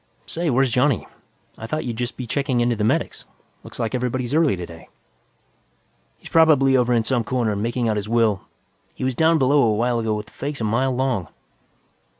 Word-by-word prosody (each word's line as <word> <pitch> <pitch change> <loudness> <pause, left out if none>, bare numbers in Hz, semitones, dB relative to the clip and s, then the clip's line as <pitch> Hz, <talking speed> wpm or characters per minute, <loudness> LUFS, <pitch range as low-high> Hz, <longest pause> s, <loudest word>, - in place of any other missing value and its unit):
Say, 170 0 -2
where's 130 -1 +2
Johnny? 125 - +2 0.5
I 110 - -6
thought 155 +6 -3
you'd 120 -2 -3
just 120 0 -3
be 125 - -5
checking 130 +1 -1
in 120 0 +2
to - - 0
the 105 - -2
medics; 110 - -1 0.4
looks - - -11
like 115 - -2
everybody's 125 0 -2
early 155 -8 +3
today." 85 -2 -10 1.3
"He's - - -13
probably 150 -5 +5
over 125 -1 +2
in 115 -2 +3
some 120 0 0
corner, 115 -3 -1
making 115 +3 -1
out 110 -1 0
his 105 +1 -4
will. 115 -4 +2 0.5
He - - -6
was 130 0 0
down 160 +5 +3
below 140 +1 +3
a 110 -4 +3
while 120 +2 0
ago 110 -1 -1
with 105 0 -6
a - - -25
face 140 +1 -5
a - - -3
mile 120 +4 +1
long." 125 - -1
120 Hz, 200 wpm, -22 LUFS, 110-135 Hz, 1.3 s, probably